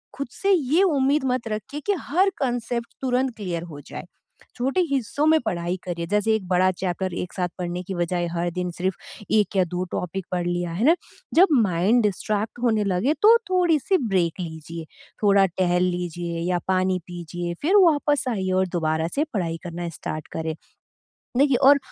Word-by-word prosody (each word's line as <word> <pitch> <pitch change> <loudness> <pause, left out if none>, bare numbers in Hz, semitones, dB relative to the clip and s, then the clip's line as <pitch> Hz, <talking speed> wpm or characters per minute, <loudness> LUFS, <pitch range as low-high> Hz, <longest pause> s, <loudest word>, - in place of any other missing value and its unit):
खुद 280 - -4
से 395 +8 0
ये 320 +1 +3
उम्मीद 285 -4 +2
मत 245 -3 -3
रखिए 215 +8 -5
कि 410 - +4
हर 370 +6 +2
कॉन्सेप्ट 240 -2 -2
तुरंत 255 -1 0
क्लियर 175 -5 -3
हो 145 - -9
जाए। - - -7 0.5
छोटे 270 +9 +1
हिस्सों 275 +1 0
में 315 0 +5
पढ़ाई 175 -3 -1
करिए, 170 -2 -4
जैसे 210 +3 +2
एक 190 -4 -4
बड़ा 185 +1 +3
चैप्टर 185 0 -2
एक 180 - -4
साथ 180 -2 -1
पढ़ने 175 0 -3
की 190 +1 -5
बजाय 175 0 -1
हर 175 0 -1
दिन 180 0 -3
सिर्फ़ 185 +2 -2 0.4
1 210 -1 +2
या 185 - +5
2 180 - -1
टॉपिक 180 +1 -3
पढ़ 180 -1 -1
लिया, 175 -1 -1
है 205 +9 -1
ना? 330 - +6 0.4
जब 370 +4 +7 0.2
माइंड 195 +5 +2
डिस्ट्रैक्ट 210 +3 -1
होने 220 -3 +2
लगे, 200 +10 +1
तो 440 +7 +6
थोड़ी-सी 360 0 +3
ब्रेक 175 -2 +1
लीजिए, 160 -1 -7 0.4
थोड़ा 200 -1 +5
टहल 180 -1 +1
लीजिए 175 -1 -2
या 175 - +1
पानी 185 0 +1
पीजिए, 175 0 -5
फिर 350 +7 +2
वापस 290 -2 +2
आइए 190 -5 -1
और 190 - 0
दोबारा 160 0 0
से 295 - +2
पढ़ाई 170 -5 -1
करना 175 -1 -5
स्टार्ट 155 -1 -5
करें। 160 -1 -3 0.8
देखिए, 275 -2 +4
और 280 +3 +7
190 Hz, 180 wpm, -24 LUFS, 175-260 Hz, 0.8 s, जब